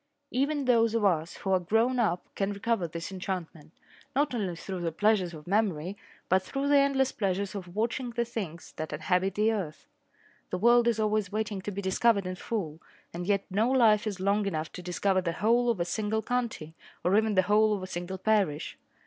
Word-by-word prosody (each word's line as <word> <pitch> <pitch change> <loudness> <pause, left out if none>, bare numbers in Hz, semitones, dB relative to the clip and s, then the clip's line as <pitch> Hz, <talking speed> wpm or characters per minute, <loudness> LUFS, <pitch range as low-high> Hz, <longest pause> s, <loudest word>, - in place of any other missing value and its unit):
Even 280 +2 0
those 230 -2 +3
of 220 -2 +2
us 165 -3 +1
who 195 - -3
are 190 - +4
grown 225 +8 +1
up 180 -6 +1
can 195 0 -1
recover 200 -2 -1
this 170 +3 -6
enchantment, 180 -5 -5 0.4
not 285 0 +2
only 195 -7 -2
through 185 +1 -6
the 170 -1 -1
pleasures 200 0 +2
of 155 -3 -11
memory 195 -3 0 0.3
but 185 +1 +3
through 275 +9 -3
the 285 0 +5
endless 270 -1 +2
pleasures 195 -1 -1
of 180 -3 -7
watching 235 +3 -1
the 235 0 -1
things 190 -8 -6
that 155 - -4
inhabit 180 +5 0
the 215 +2 +3
earth. 185 -9 -4 0.6
The 180 - -2
world 235 +3 +5
is 230 -2 +2
always 215 -2 0
waiting 210 -2 -2
to 195 - -5
be 200 +1 -5
discovered 200 +1 +2
in 185 - -3
full, 180 -5 -4 0.3
and 175 +1 -5
yet 200 -1 +1
no 215 +5 +2
life 225 -5 +4
is 200 -3 -3
long 200 +2 +1
enough 160 -4 -3
to - - -8
discover 185 +2 0
the 170 -2 -2
whole 235 +6 +2
of 230 -5 0
a 170 - +1
single 220 +3 -1
county, 235 -11 -2 0.3
or 180 +3 +3
even 220 -1 +2
the 185 - +5
whole 210 +2 +3
of 190 - -6
a - - -3
single 180 +1 -5
parish. 190 -7 0
200 Hz, 205 wpm, -29 LUFS, 180-225 Hz, 0.6 s, the